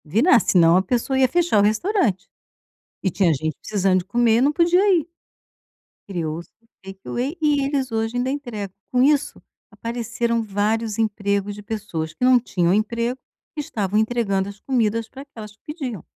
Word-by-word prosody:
Virar, 230 - +4
se 190 - +1
não, 170 0 +6
a - - +4
pessoa 245 +6 -1
ia 260 - +5
fechar 345 -5 +2
o - - +5
restaurante. 220 - 0 0.8
E 190 - +1
tinha 180 -1 +2
gente 155 +2 -2
precisando 195 -3 +1
de - - -9
comer 230 +3 +2
e - - +2
não 280 +3 +3
podia 345 +3 +3 0.2
ir. 315 - -4 1.0
Criou-se 170 -3 -4
os 230 - -32 0.2
Take 195 0 -10
Away 270 +8 -3
e 295 -2 +2
eles 270 -2 -1
hoje 225 +2 -1
ainda 250 +1 0
entregam, 240 -9 -5 0.2
com 250 - +2
isso, 290 +1 +1 0.3
apareceram 235 0 -2
vários 215 +1 -1
empregos 200 -2 -1
de 210 - -9
pessoas, 200 -8 -4
que 250 - -1
não 255 -1 +6
tinham 180 -7 0
emprego 235 +4 -1 0.4
e - - 0
estavam 210 -7 -1
entregando 215 -4 0
as 200 0 -11
comidas 230 -3 0
para 270 - -11
aquelas 220 -7 -11
que - - -50
pediam. 250 - -5
225 Hz, 180 wpm, -22 LUFS, 200-255 Hz, 1.0 s, não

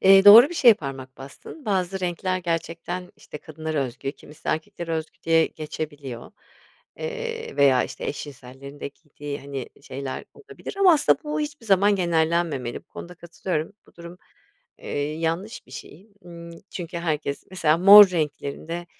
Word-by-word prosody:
eee, 195 +1 +7
doğru 230 +7 +10
bir 350 - -7
şeye 240 -8 +7
parmak 135 -5 -8
bastın. 140 - -12
Bazı 190 -2 -1
renkler 185 +1 -2
gerçekten, 175 +1 -4
işte, 150 - -10
kadınlara 155 0 -5
özgü, 130 +2 -6
kimisi 150 0 -12
erkeklere 165 +1 -3
özgü 160 0 -4
diye 165 0 +3
geçebiliyor. 145 -5 -7 0.7
Eee, 475 -1 -5
veya, 135 -3 +4
işte, - - -8
eş 145 - -4
cinsellerin 140 +1 -12
de - - -4
giydiği, 145 -1 -9
hani, 140 -2 -6
şeyler 135 0 -6
olabilir 420 -2 -10
ama 370 -3 +7
aslında 295 - +3
bu 300 +1 -2
hiçbir 290 -5 -6
zaman 200 0 +4
genellenmemeli. 165 -7 0
Bu - - -62
konuda 180 - -10
katılıyorum. 170 -1 -4
Bu - - -23
durum, 170 +1 -11 0.6
eee, - - -9 0.3
yanlış 165 +7 -3
bir 130 - -17
şey. 185 +9 -11
Imm, 170 -1 -11 0.2
çünkü 170 -1 -6
herkes 155 -4 -3
mesela, 160 -4 +2
mor 200 +3 +10
renklerin 150 -2 -3
de, 175 +1 -5
170 Hz, 155 wpm, -24 LUFS, 145-195 Hz, 0.7 s, doğru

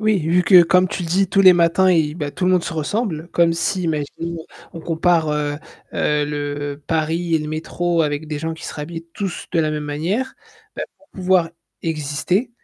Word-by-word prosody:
Oui 215 -2 +2
vu 170 +2 +2
que 180 -1 +8
comme 185 +2 +3
tu 180 - -4
dis 185 +3 +1
tous 195 - +3
les 185 -1 +9
matins 175 +2 +3
y 155 -4 +2
bah, 145 -4 -4
tout 180 0 -1
le - - +4
monde 180 -2 +2
se - - -4
ressemble. 165 - -2
Comme 170 -1 +3
si, 185 +3 -1
imagine 165 +2 -3 0.3
on 165 - -8
compare, 165 0 +1
heu 150 -1 -1 0.4
heu, 150 0 +1
le 145 0 -4
Paris 165 +1 0
et 160 - +4
le 150 - -5
métro 165 +2 -1
avec 150 0 -2
des 150 -1 -4
gens 160 +1 -3
qui 160 - -11
seraient 150 - -5
habillés 165 +2 -7
tous 195 -3 -4
de 170 - +3
la 155 -1 +1
même 150 -1 -3
manière. 175 - -2 0.4
Bah - - -4
pour 290 - -26
pouvoir 180 -3 +2 0.3
exister, 160 - -1
165 Hz, 205 wpm, -20 LUFS, 150-180 Hz, 0.4 s, les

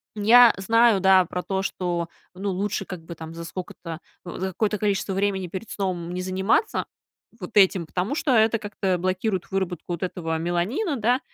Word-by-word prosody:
я 230 +3 +7
знаю, 225 +1 +4
да, 190 -1 +6
про 180 +1 -4
то, 190 -1 -1
что, 175 -3 -2 0.3
ну, 195 +2 -4
лучше, 195 +1 -2
как 180 -3 -8
бы, 170 - -8
там, 160 0 -9
за 170 - -6
сколько-то, 165 -1 -7 0.3
за 185 +1 -4
какое-то 210 +3 -1
количество 200 -1 0
времени 195 -1 0
перед 190 +5 -7
сном 180 -3 -3
не 180 - -3
заниматься 190 - +1 0.5
вот 180 0 -7
этим, 190 -3 +5
потому 185 - -2
что 295 - 0
это 225 +1 +4
как-то 200 -3 -1
блокирует 185 +1 -2
выработку 180 -3 -2
вот 170 - -4
этого 165 -3 -2
меланина, 180 - -1
да. 240 +3 +2
190 Hz, 175 wpm, -24 LUFS, 180-210 Hz, 0.5 s, я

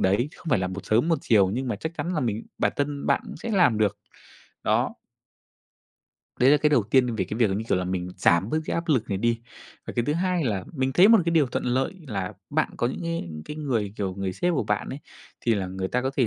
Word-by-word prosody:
đấy, 100 +8 +2
không - - -16
phải 125 - +4
là 95 - -1
một 95 +1 -6
sớm 115 +8 +2
một 165 -4 +2
chiều, 100 -5 +4
nhưng 125 +5 -2
mà 105 - -1
chắc 160 +10 -5
chắn 180 +2 -2
là 155 - 0
mình 115 -3 -2
bản - - +2
thân 145 0 -2
bạn - - +3
cũng - - -8
sẽ 230 - -5
làm 175 - +4
được. 105 -2 +1 0.7
Đó. - - +1 1.5
Đấy 130 +2 +6
là 150 - +7
cái 150 0 +2
đầu 125 -6 +4
tiên 125 +3 +2
về 95 -4 0
cái 105 - -5
việc 115 -3 +4
là, - - 0
như 110 +3 -2
kiểu - - +2
là, 90 - -2
mình 90 -1 -2
giảm 90 +2 +3
bớt 155 - +1
cái - - -2
áp 170 +1 -3
lực 130 -8 +2
này 95 -2 -1
đi. 115 +1 +1 0.5
Và - - -5
cái 120 - +2
thứ 145 - +1
hai 180 0 0
là 100 -7 -1
mình 130 -2 -1
thấy 185 +7 +7
một 225 -1 +8
cái 170 - +1
điều 155 -4 +4
thuận 125 - -3
lợi 130 +7 0
là 95 -6 -3 0.2
bạn - - +1
có 120 - +1
những 125 - -4
cái 165 - -3 0.2
cái 150 - -7
người 115 -9 -1
kiểu 95 -2 -2
người 95 -1 -3
sếp 175 - 0
của 140 - +1
bạn 105 0 -1
ấy, 135 - -5 0.4
thì 115 - +2
là 100 -3 -2
người 95 +1 -4
ta 125 +4 0
có 130 - 0
thể 130 - +3
120 Hz, 270 wpm, -25 LUFS, 100-150 Hz, 1.5 s, một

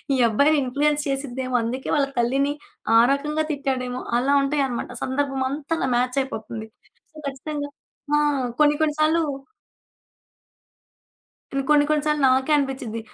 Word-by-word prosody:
ఈ - - 0
అబ్బాయిని 285 +8 +3
ఇన్‌ఫ్లుయెన్స్ 290 +3 +1
చేసిద్దేమో. 260 -2 -3
అందుకే 250 +4 -4
వాళ్ళ 285 -2 +3
తల్లిని 270 +4 +1 0.4
ఆ - - +8
రకంగా 300 +2 -1
తిట్టాడేమో 260 -3 -2 0.2
అలా 270 +3 +1
ఉంటాయనమాట. 275 -3 -1
సందర్భమంతా 275 +2 -2
అలా - - 0
మ్యాచయిపోతుంది. 245 -3 -2 0.4
సో, 310 - -17
ఖచ్చితంగా. 285 +1 -5 0.5
ఆ! - - +4 0.4
కొన్ని 295 -1 +5
కొన్ని 310 -1 +2
సార్లు 320 +2 +3 2.3
నేను 275 0 0
కొన్ని 295 -1 +6
కొన్ని 305 -1 +2
సార్లు 300 -1 +1
నాకే 260 +3 +2
అనిపించిద్ది. 265 -5 -3
275 Hz, 125 wpm, -23 LUFS, 255-295 Hz, 2.3 s, ఆ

